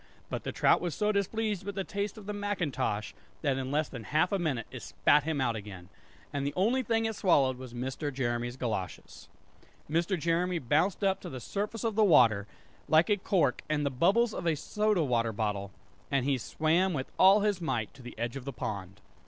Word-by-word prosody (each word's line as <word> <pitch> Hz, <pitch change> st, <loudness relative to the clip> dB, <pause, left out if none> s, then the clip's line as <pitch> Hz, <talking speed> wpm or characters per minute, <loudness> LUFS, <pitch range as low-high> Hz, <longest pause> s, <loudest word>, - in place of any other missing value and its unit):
But -, -, -3 dB
the -, -, -2 dB
trout -, -, +3 dB
was 175 Hz, -5 st, -2 dB
so 210 Hz, 0 st, +1 dB
displeased 210 Hz, 0 st, -1 dB
with 200 Hz, +1 st, -5 dB
the 195 Hz, -, -1 dB
taste 200 Hz, +2 st, -3 dB
of 210 Hz, -, -10 dB
the 210 Hz, -, -4 dB
macintosh, 175 Hz, -, -2 dB, 0.3 s
that 140 Hz, -3 st, +2 dB
in 130 Hz, 0 st, -3 dB
less 150 Hz, +2 st, +1 dB
than 120 Hz, -5 st, -8 dB
half 155 Hz, -, +2 dB
a 200 Hz, -, +1 dB
minute 135 Hz, -10 st, -1 dB
it -, -, -7 dB
spat 145 Hz, 0 st, +2 dB
him 160 Hz, -2 st, -1 dB
out 120 Hz, -3 st, +1 dB
again; 100 Hz, -4 st, -8 dB, 0.4 s
and 140 Hz, -1 st, -1 dB
the 140 Hz, -, -2 dB
only 230 Hz, +8 st, +2 dB
thing 225 Hz, -2 st, 0 dB
it 220 Hz, -1 st, -1 dB
swallowed 135 Hz, -10 st, +3 dB
was 130 Hz, -2 st, -9 dB
Mr. 130 Hz, +4 st, -3 dB
Jeremy's 120 Hz, -2 st, -2 dB
goloshes. 110 Hz, -8 st, -5 dB, 0.6 s
Mr. 170 Hz, +4 st, 0 dB
Jeremy 170 Hz, +3 st, +1 dB
bounced 160 Hz, -, +1 dB
up 195 Hz, -1 st, +2 dB
to -, -, -7 dB
the 130 Hz, -, -6 dB
surface 205 Hz, -, -4 dB
of 225 Hz, -1 st, 0 dB
the 215 Hz, +1 st, +3 dB
water, 115 Hz, -, +5 dB, 0.4 s
like 160 Hz, +6 st, +4 dB
a 205 Hz, -, +4 dB
cork 175 Hz, -9 st, +1 dB
and 150 Hz, -1 st, +1 dB
the 140 Hz, -, 0 dB
bubbles 200 Hz, -, +3 dB
out -, -, -4 dB
of 170 Hz, -, -3 dB
a 160 Hz, -, +3 dB
soda 210 Hz, +4 st, +1 dB
water 115 Hz, -4 st, +1 dB
bottle; 105 Hz, -2 st, -2 dB, 0.4 s
and 135 Hz, -3 st, +1 dB
he 135 Hz, -2 st, +1 dB
swam 165 Hz, +9 st, +1 dB
with 135 Hz, -3 st, -4 dB
all 195 Hz, +2 st, +7 dB
his 205 Hz, -3 st, 0 dB
might 115 Hz, -9 st, -2 dB
to 135 Hz, -, -14 dB
the 120 Hz, -2 st, -10 dB
edge 120 Hz, +2 st, -3 dB
of 135 Hz, -, -6 dB
the 140 Hz, -, -3 dB
pond. 100 Hz, -3 st, -5 dB
155 Hz, 215 wpm, -30 LUFS, 125-195 Hz, 0.6 s, all